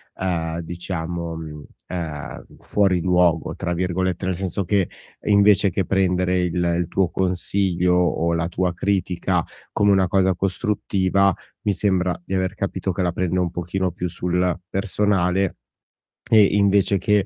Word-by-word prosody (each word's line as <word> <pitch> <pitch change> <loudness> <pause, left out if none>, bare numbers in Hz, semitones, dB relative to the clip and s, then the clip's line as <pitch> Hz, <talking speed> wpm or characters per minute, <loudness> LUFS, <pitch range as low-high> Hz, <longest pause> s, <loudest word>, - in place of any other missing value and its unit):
ehm, 85 -3 -2
diciamo, 85 -1 -5
mhmm, 75 -2 -8 0.2
ehm, 80 -5 -6
"fuori 95 -3 +1
luogo", 90 -2 +2
tra 90 -2 -3
virgolette, 90 +1 -1
nel 95 -1 0
senso 95 +1 -2
che 95 0 +1 0.4
invece 100 -1 +5
che 95 +1 -1
prendere 90 -1 +1
il 90 -1 -1 0.2
il 85 -1 -1
tuo 95 0 +1
consiglio 90 0 0
o 85 -1 +1
la 85 0 0
tua 90 0 -1
critica 95 -1 0 0.3
come 100 -1 +3
una 95 -1 +3
cosa 95 0 +2
costruttiva, 95 0 +1 0.3
mi 105 - 0
sembra 95 -2 +1
di 95 - -5
aver 95 +1 -1
capito 95 -1 -2
che 95 +1 -3
la 90 - +1
prende 90 0 -1
un 90 -2 0
pochino 90 +1 -2
più 90 +1 -4
sul 90 +1 -1
personale 95 -2 0 0.7
e 110 -2 +7
invece 100 0 +3
che 105 +2 +2
90 Hz, 145 wpm, -22 LUFS, 85-95 Hz, 0.7 s, e